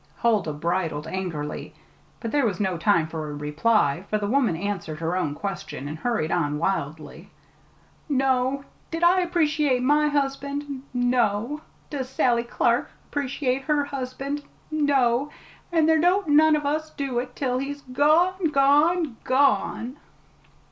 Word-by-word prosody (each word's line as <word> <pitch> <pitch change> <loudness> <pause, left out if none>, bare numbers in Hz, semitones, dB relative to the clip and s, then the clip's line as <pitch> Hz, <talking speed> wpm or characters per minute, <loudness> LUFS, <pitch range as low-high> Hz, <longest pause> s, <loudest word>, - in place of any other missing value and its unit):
Huldah 215 -9 +1
bridled 165 -1 -2
angrily, 160 -4 -5 0.4
but 230 - -4
there 290 -1 +2
was 195 -4 -3
no 190 -3 0
time 170 -1 +2
for 160 -1 -5
a 145 - -5
reply, 150 +3 +1
for 215 - +1
the 210 - -3
woman 230 -4 +2
answered 175 -5 -4
her 165 +2 -1
own 150 -6 -1
question, 195 -7 -5
and 155 +2 -6
hurried 225 -9 -1
on 150 -4 0
wildly. 155 -3 -3 0.8
"No. 265 0 +1 0.2
Did 330 +1 -3
I 355 +2 +6
appreciate 305 -7 +1
my 295 +3 +4
husband? 280 -1 -2
No. 245 +2 +1 0.3
Does 265 -3 -3
Sally 245 -2 +2
Clark 235 - +1 0.2
appreciate 275 -2 -1
her 295 -2 +1
husband? 275 +1 -4 0.3
No. 280 -3 +2 0.4
And 325 -2 +3
there 320 0 +4
don't 360 +1 +2
none 310 +1 +6
of 295 -1 -2
us 310 +2 -1
do 275 -5 -2
it 245 0 -6
till 255 -2 -1
he's 285 +1 -5
gone 315 +8 +2
gone 295 0 +3
gone!" 260 -1 +1
255 Hz, 140 wpm, -25 LUFS, 195-290 Hz, 0.8 s, I